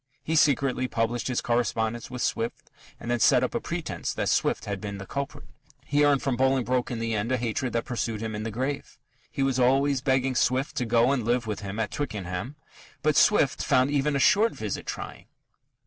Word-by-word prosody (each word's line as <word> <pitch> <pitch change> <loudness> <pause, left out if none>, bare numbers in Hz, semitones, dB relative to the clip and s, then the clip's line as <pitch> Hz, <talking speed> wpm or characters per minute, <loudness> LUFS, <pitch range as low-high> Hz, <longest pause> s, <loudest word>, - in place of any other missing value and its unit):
He 160 - -1
secretly 135 -4 +2
published 115 0 -1
his 125 -2 -1
correspondence 120 -1 -1
with 125 -1 -4
Swift 115 +1 -3 0.3
and 120 - -4
then 120 - +1
set - - +5
up - - -1
a - - 0
pretence - - -4
that - - -1
Swift - - +1
had 100 -2 -4
been 100 -1 -5
the 100 - -7
culprit. 140 +6 -5 0.4
He 145 +1 +2
earned 145 -2 +3
from 135 -3 0
Bolingbroke 130 -1 +1
in 120 - -3
the 115 0 -2
end 110 +3 -1
a 130 - +2
hatred 120 +1 -2
that 115 - -1
pursued 115 -3 -3
him 110 0 -4
in 105 - -4
the 115 - -3
grave. 130 +6 -4 0.3
He 135 - -2
was 135 -1 +1
always 135 +2 +3
begging 130 -1 +1
Swift 130 +3 +1
to 125 - 0
go 115 +3 +4
and 135 -4 0
live 120 +1 +1
with 105 -2 -3
him 100 0 -6
at 110 -1 -1
Twickenham. 105 -2 -4 0.5
But - - +2
Swift - - +4
found 130 +2 +3
even 145 0 +1
a - - +1
short 210 - +4
visit - - -5
trying. - - -6
125 Hz, 210 wpm, -26 LUFS, 115-135 Hz, 0.5 s, set